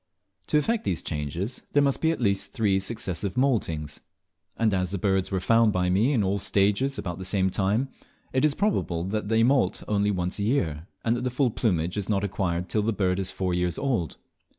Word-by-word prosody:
To - - +2
effect 225 +9 +1
these 90 -4 -2
changes 80 - -3
there 145 - +5
must 140 -1 +1
be 160 - +3
at 165 - -1
least 100 -5 0
three 105 -5 +2
successive 95 -2 -4
moultings; 85 - 0 0.6
and 110 -2 +2
as 90 -1 0
the 100 - -2
birds 95 0 +1
were 95 - -1
found 115 +3 +4
by 90 -2 +1
me 105 +9 +3
in 120 -7 +2
all 100 +1 0
the - - -2
stages 105 +8 +2
about 90 -1 -4
the - - -5
same 95 0 +1
time, 105 +8 +1 0.5
it 130 - +2
is 150 -2 +3
probable 140 - 0
that 105 +3 -2
they 110 +1 +3
moult 130 +2 +2
only 105 -1 +1
once 90 -1 -1
a - - 0
year, 85 - 0 0.2
and 115 +1 +2
that 120 - -3
the 125 - 0
full 125 0 +1
plumage 90 -6 0
is 100 -1 -3
not 100 -2 +1
acquired 90 -3 -1
till 110 - 0
the 110 +2 +1
bird 95 -2 0
is 95 - -1
four 95 -2 -2
years 90 -1 0
old. 115 - -1
100 Hz, 220 wpm, -26 LUFS, 90-115 Hz, 0.6 s, there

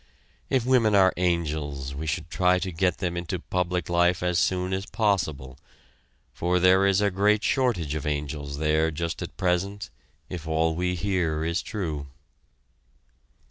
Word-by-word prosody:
If 130 -3 +1
women 120 -5 +3
are 95 -1 +5
angels 75 -6 -1
we 75 +3 -5
should 75 +2 -3
try 90 0 +3
to 90 0 -3
get 90 +2 0
them 90 -3 -2
into 85 +1 -3
public 90 0 -2
life 85 0 +2
as 90 -1 +1
soon 90 0 0
as 95 +1 -3
possible, 80 - -1 0.7
for 90 +1 0
there 95 +2 +5
is 100 0 +3
a 100 -1 +2
great 105 +3 +2
shortage 110 - +1
of 75 -1 -3
angels 75 -1 -3
there 80 +1 +2
just 80 +1 -4
at - - -7
present, 95 +1 -1 0.4
if 85 -3 -7
all 80 +1 +1
we 90 +2 -1
hear 85 -4 -1
is 85 +2 0
true. 80 -10 -4
90 Hz, 155 wpm, -26 LUFS, 80-95 Hz, 0.7 s, are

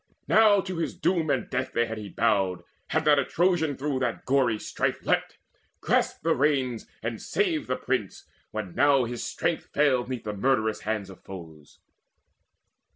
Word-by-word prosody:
Now 215 -2 +6
to 185 -2 -5
his 165 - -2
doom 170 -4 0
and - - 0
death 130 0 -3
day 120 - +3
had 110 -1 -5
he 105 -1 -7
bowed, 95 -6 +1 0.2
Had 160 -1 0
not 145 -1 +5
a - - +2
Trojan 165 -2 +1
through 140 -1 -1
that 120 -3 -2
gory 130 -4 +2
strife - - -2
Leapt, - - 0 0.4
grasped - - 0
the - - +3
reins, 130 -4 0 0.2
and 115 0 -3
saved 345 -7 0
the - - 0
prince, 125 -7 -3 0.2
when 105 -5 -5
now 140 -2 +4
His 120 0 -4
strength - - -2
failed 130 -4 +2
'neath 125 -3 -4
the 105 - -4
murderous 110 0 +1
hands 105 -3 -3
of 95 - -14
foes. 80 -6 -11
130 Hz, 170 wpm, -27 LUFS, 110-150 Hz, 0.4 s, Now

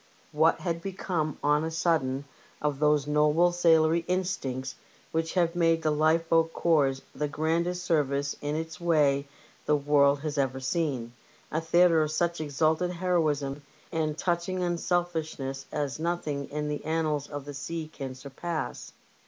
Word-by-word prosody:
What 160 +2 +3
had 170 -2 -2
become 175 -5 -2
on 150 +1 +3
a 160 - -1
sudden 150 -5 0 0.3
of 150 -2 -1
those 150 -2 +3
noble 150 +4 +3
sailorly 165 -1 +4
instincts 140 -9 -2 0.4
which 160 +2 -1
have 170 -2 +2
made 165 -1 +2
the 155 - +2
lifeboat 165 +2 +2
corps 140 -5 +2
the 150 - -2
grandest 170 +4 -1
service 140 -4 +1
in 145 +1 -2
its 160 +1 -5
way 145 -4 +2 0.4
the 150 - +4
world 140 -1 +3
has 150 -2 -2
ever 130 -1 0
seen 130 -4 -2 0.2
— - - -30
a 160 - 0
theatre 165 0 +4
of 155 - 0
such 170 +1 0
exalted 155 +4 +1
heroism 155 -6 0 0.3
and 155 -1 -1
touching 180 +1 -1
unselfishness 165 -6 -2
as 145 -1 -2
nothing 155 -4 -2
in 150 0 -3
the 150 0 -3
annals 155 -2 -1
of 145 -2 -6
the 145 - -7
sea 155 +3 -5
can 135 -4 -7
surpass? 145 +5 -5
155 Hz, 150 wpm, -28 LUFS, 145-170 Hz, 0.4 s, sailorly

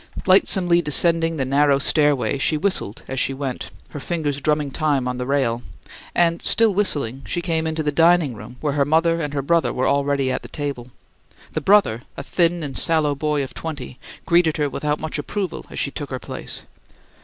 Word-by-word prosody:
Lightsomely 185 -2 +4
descending 165 +1 +2
the 135 - -1
narrow 140 +1 +3
stairway, 140 -4 +1
she 155 +3 +1
whistled 150 - -2
as 130 0 -3
she 135 - 0
went, 135 -2 -5 0.2
her 145 - -7
fingers 145 -3 -2
drumming 150 -2 0
time 145 -3 0
on 125 0 -3
the 125 0 -4
rail; 130 -4 0 0.5
and, 170 -1 +2
still 225 -2 +5
whistling, 145 - -1
she 175 - -2
came 165 -2 -1
into 160 0 -2
the 150 - 0
dining 165 -2 +4
room, 110 +3 -11
where 150 -2 -1
her 145 -1 +2
mother 165 +3 +2
and 145 -2 -4
her 140 - -1
brother 170 +3 +2
were 130 - -1
already 140 -1 +1
at - - -2
the - - -10
table. 140 -4 -5 0.6
The 155 - -2
brother, 190 - +3 0.2
a - - -5
thin 170 -1 +1
and 140 -2 -5
sallow 155 -3 +2
boy 150 0 -1
of 135 - -8
twenty, 145 -5 -7 0.3
greeted 170 -2 +3
her 145 -2 0
without 150 +2 -2
much 160 0 -3
approval 185 +4 -4
as - - -9
she 140 - -1
took 145 -1 -6
her 130 - -3
place. - - -7
150 Hz, 195 wpm, -21 LUFS, 135-165 Hz, 0.6 s, still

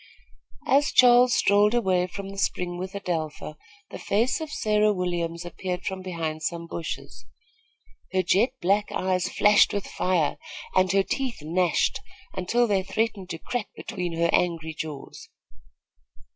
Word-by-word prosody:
As 285 +2 +3
Charles 245 0 +6
strolled 205 +3 +4
away 185 -6 +2
from 195 +2 -7
the 195 - -9
spring 175 -2 -1
with 190 +2 -6
Adelpha, 160 -5 -4 0.4
the - - -7
face 235 +9 0
of 315 - -5
Sarah 210 -3 +2
Williams 175 -3 -2
appeared 180 +1 -5
from 190 -1 -3
behind 165 -4 -4
some 170 +1 -3
bushes. 165 0 -7 0.8
Her 185 0 +1
jet 195 +8 +3
black 200 +3 +2
eyes 185 -1 0
flashed 210 0 +4
with 200 -1 -2
fire, 180 -5 0 0.4
and 185 -1 +3
her 195 0 +3
teeth 250 - -3
gnashed 175 - +1 0.3
until 210 +6 +1
they 200 -4 +1
threatened 200 -1 -2
to 165 - -4
crack 220 +5 -4
between 180 -6 -5
her 170 0 +2
angry 165 -2 0
jaws. 150 -3 -8
185 Hz, 145 wpm, -25 LUFS, 170-210 Hz, 0.8 s, Charles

